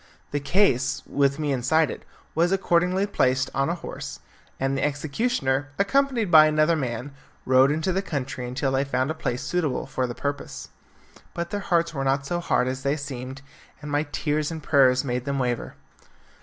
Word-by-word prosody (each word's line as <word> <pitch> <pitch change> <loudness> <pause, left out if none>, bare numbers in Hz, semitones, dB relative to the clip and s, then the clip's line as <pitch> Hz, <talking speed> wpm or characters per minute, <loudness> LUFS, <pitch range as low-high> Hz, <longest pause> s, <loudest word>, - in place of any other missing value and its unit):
The 145 - 0
case, 135 -5 +2
with 140 0 +1
me 150 -2 -1
inside 140 +5 +2
it, - - -8 0.3
was 170 +2 +2
accordingly 185 0 +2
placed 130 -9 +1
on 135 +3 +1
a 170 - 0
horse, - - -7 0.4
and 135 +1 0
the 135 - -1
executioner, 145 - 0
accompanied 240 -1 +1
by 155 -2 +9
another 155 +2 +3
man, 125 -1 -3 0.3
rode 130 +1 +5
into 160 +5 0
the 190 - +1
country 135 -8 -4
until 135 +2 -1
they 135 +1 +2
found 130 +1 -1
a - - -1
spot 125 0 -2
suitable 155 -4 -1
for 130 -1 -2
the 120 - -6
purpose. 140 0 -5 0.7
But 170 +1 -4
their 205 - -1
hearts 170 -4 +1
were 135 -3 -2
not 135 +1 +1
so 175 +4 -1
hard 130 -6 +1
as 130 +1 -3
they 140 +2 0
seemed, 135 -1 -7 0.4
and 150 -1 -7
my 145 +1 0
tears 150 0 -1
and 160 -2 -6
prayers 130 -3 +4
made 125 -1 -2
them 140 -1 -1
waver. 125 -3 -2
145 Hz, 185 wpm, -25 LUFS, 130-165 Hz, 0.7 s, by